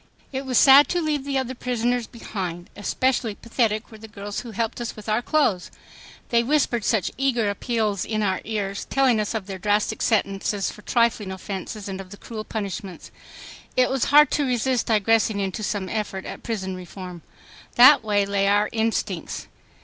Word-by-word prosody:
It 265 +1 -4
was 255 -2 +1
sad 275 +1 +8
to 355 - 0
leave 300 -4 -1
the 280 -1 -1
other 260 -1 -2
prisoners 245 -1 -1
behind. 180 -7 -6
Especially 230 +2 0
pathetic 225 -1 -1
were 220 - -12
the 220 - -10
girls 205 -1 -6
who 245 - -8
helped 225 +2 -3
us 235 - -4
with 215 0 -11
our 215 +2 +1
clothes. 240 - +1 0.6
They 235 -1 +4
whispered 245 -3 +1
such 215 -4 +1
eager 240 -6 +1
appeals 215 -2 -1
in 215 -1 -1
our 190 -2 0
ears, 200 -2 -3
telling 260 -4 +2
us 210 +2 -2
of 215 -4 -3
their 190 -1 -7
drastic 205 +2 0
sentences 200 -2 0
for 210 - -13
trifling 230 -4 +1
offenses 195 +2 -6
and 195 -1 -5
of 185 - -12
the 205 - -11
cruel 220 0 -7
punishments. 200 -5 -6 0.7
It 255 0 +4
was 265 -3 +1
hard 295 +1 +6
to 295 - +1
resist 250 0 0
digressing 220 -1 +2
into 195 +2 -2
some 205 -2 -2
effort 205 -2 -3
at - - -7
prison 190 -5 -3
reform. 180 -1 -9 0.5
That 260 +2 +8
way 205 -2 +2
lay 200 0 +1
our 205 +1 +3
instincts. 225 0 -2
220 Hz, 180 wpm, -24 LUFS, 200-245 Hz, 0.7 s, sad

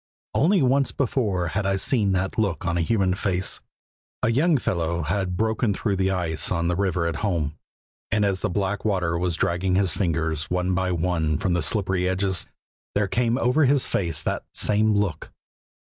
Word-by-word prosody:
Only 170 +2 +3
once 135 +2 +2
before 105 - -1
had 100 +4 -1
I 95 - +1
seen 100 0 +2
that 95 0 -1
look 95 -8 -1
on 85 -1 0
a 85 - +1
human 95 0 +1
face. 95 -1 -1 0.6
A 115 - +3
young 150 +6 +3
fellow 85 -6 -1
had 90 +3 -2
broken 110 -1 0
through 100 -2 -1
the 95 0 +1
ice 85 -5 0
on 85 -2 0
the 90 - 0
river 90 -3 0
at 85 -2 -2
home, 80 -8 -1 0.5
and 105 0 +1
as 95 -2 0
the - - 0
black 100 +1 -2
water 90 -6 0
was 85 0 -1
dragging 90 +2 0
his 95 -2 +2
fingers 80 -4 -1
one 90 +1 0
by 95 0 0
one 85 -3 0
from 90 +3 -1
the 85 - +1
slippery 95 0 +1
edges, 95 -1 0 0.5
there 105 0 +2
came 120 +3 0
over 135 +4 +3
his 135 0 +3
face 85 -4 -1
that - - -2
same 105 +1 +3
look. 100 -7 -1
95 Hz, 185 wpm, -24 LUFS, 85-105 Hz, 0.6 s, Only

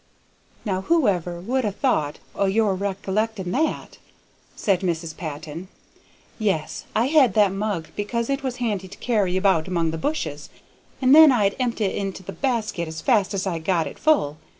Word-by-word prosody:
"Now, 190 -3 -1
whoever 190 - +1
would 250 +8 -1
ha' 205 -3 -2
thought 155 - +1 0.2
o' 200 - +1
your 210 0 +2
rec'lecting 195 +1 -2
that?" 310 +8 -2 0.6
said 195 -3 +1
Mrs. 165 -3 -2
Patton. 155 +2 -7 0.7
"Yes. 190 -8 -1
I 225 +2 +3
had 270 -7 +4
that 205 -3 +4
mug 195 -5 -3
because 230 +3 -2
it 275 +1 -1
was 260 -3 -3
handy 210 -6 -2
to 200 - -12
carry 205 -6 0
about 185 -5 +2
among 170 -3 0
the 160 - -4
bushes, 300 - -3 0.5
and 260 +1 +6
then 310 -1 +9
I'd 205 -5 +2
empt' 240 -3 -1
it 195 -3 +1
into 195 -1 -4
the 195 - -7
basket 215 -5 -1
as 160 0 -6
fast 205 - +2
as 195 - -2
I 175 -4 -2
got 165 0 0
it - - -8
full. 155 - +2
195 Hz, 175 wpm, -23 LUFS, 175-235 Hz, 0.7 s, then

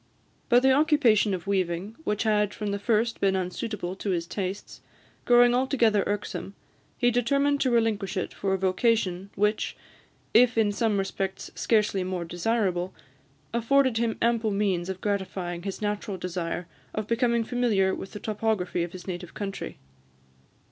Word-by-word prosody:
But 245 0 +6
the 265 - +6
occupation 265 -8 +4
of 180 - -8
weaving, 190 +1 -1
which 210 +1 0
had 210 -2 +1
from 210 -2 -3
the 200 - -2
first 230 +2 0
been 195 -1 +3
unsuitable 185 0 -3
to 200 - -4
his 170 -3 0
tastes, 190 +2 -5 0.4
growing 245 0 +6
altogether 245 -5 +2
irksome, 205 -1 -4 0.4
he 245 -1 +3
determined 280 +4 +2
to 260 - +3
relinquish 220 -4 +1
it 185 - -2
for 195 -1 -1
a - - -1
vocation 190 0 +1
which, 210 +1 0 0.6
if 245 +1 +5
in 215 -2 +3
some 210 0 +1
respects 195 0 -3
scarcely 210 -4 +1
more 180 -2 -3
desirable, 180 0 -1 0.6
afforded 250 +1 +3
him 230 -1 0
ample 230 -1 +2
means 195 -3 0
of 190 -1 -5
gratifying 190 -4 -2
his 195 +3 -5
natural 205 -1 -2
desire 175 -1 -3 0.3
of 215 - -2
becoming 235 +1 +1
familiar 220 -6 +1
with 195 - -7
the 210 - -6
topography 210 -5 -1
of 170 0 -3
his 185 - -9
native 180 -2 -6
country. 195 -2 -5
205 Hz, 155 wpm, -27 LUFS, 190-230 Hz, 0.6 s, But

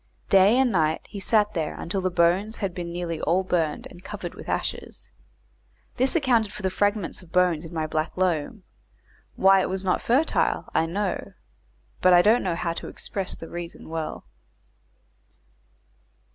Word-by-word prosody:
Day 195 +4 +6
and 260 -2 +3
night 160 -4 +1
he 205 - -7
sat 210 +1 +2
there 160 -4 -3
until 190 +3 -2
the 185 - 0
bones 180 +5 +2
had 195 -4 -3
been 175 -1 -5
nearly 170 -2 -4
all 180 +4 +2
burned 165 -5 -1
and 175 - -14
covered - - -6
with - - -10
ashes. - - -4 0.9
This 260 +4 +2
accounted 240 -9 +2
for 210 - -9
the 190 - 0
fragments 205 -1 -1
of 175 -3 -17
bones 180 -3 +2
in 165 - -9
my 160 -2 -2
black 155 +2 -2
loam; 185 +2 -1 0.7
why 195 0 +5
it - - -1
was 190 0 -3
not 180 - +1
fertile, 275 +7 +1
I 165 - +2
know, 195 +2 -3 0.7
but 185 0 +6
I 175 0 +7
don't 225 +4 +4
know 180 -3 -1
how 170 0 -2
to - - -7
express 195 -2 -5
the 165 - -9
reason 170 -1 -8
well. 160 -1 -4
185 Hz, 170 wpm, -25 LUFS, 170-205 Hz, 0.9 s, I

